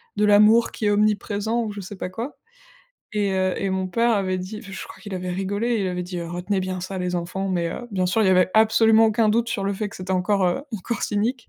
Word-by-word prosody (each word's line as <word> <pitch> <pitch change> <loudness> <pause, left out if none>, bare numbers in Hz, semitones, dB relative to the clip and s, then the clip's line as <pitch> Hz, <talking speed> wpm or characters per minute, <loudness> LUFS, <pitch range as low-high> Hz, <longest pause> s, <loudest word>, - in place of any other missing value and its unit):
de 210 - +2
l'amour 210 +3 +5
qui 215 - -4
est 205 - +3
omniprésent 210 +2 +1
ou 215 - -4
je 200 - -6
sais 190 +1 -9
pas - - -4
quoi, 230 +9 -6 0.8
et 205 -2 +1
heu, 185 -1 +1
et 195 - -1
mon 190 0 -1
père 235 +4 +2
avait 190 -3 0
dit 195 +4 -6
enfin 195 - -12
je - - -6
crois - - -13
qu'il 205 -3 -7
avait 180 0 -4
rigolé, 200 +6 -1
il 190 - 0
avait 180 0 -3
dit, 180 0 -6
heu: 170 -1 -5
«Retenez 180 +3 -2
bien 185 -1 -3
ça 190 0 -5
les 180 0 -2
enfants!», 190 +3 -3
mais 170 -2 0
heu, 240 - -7
bien 185 -2 0
sûr 205 +5 +1
il - - +3
y - - +4
avait 185 0 +4
absolument 220 0 +5
aucun 220 0 +2
doute 235 +2 +1
sur 200 -4 -2
le 200 - 0
fait 205 +1 -3
que - - -11
c'était 185 0 -7
encore 185 +1 +1
heu, 220 +10 0
encore 205 +4 -4
cynique. 225 +4 -1
200 Hz, 265 wpm, -23 LUFS, 185-220 Hz, 0.8 s, l'amour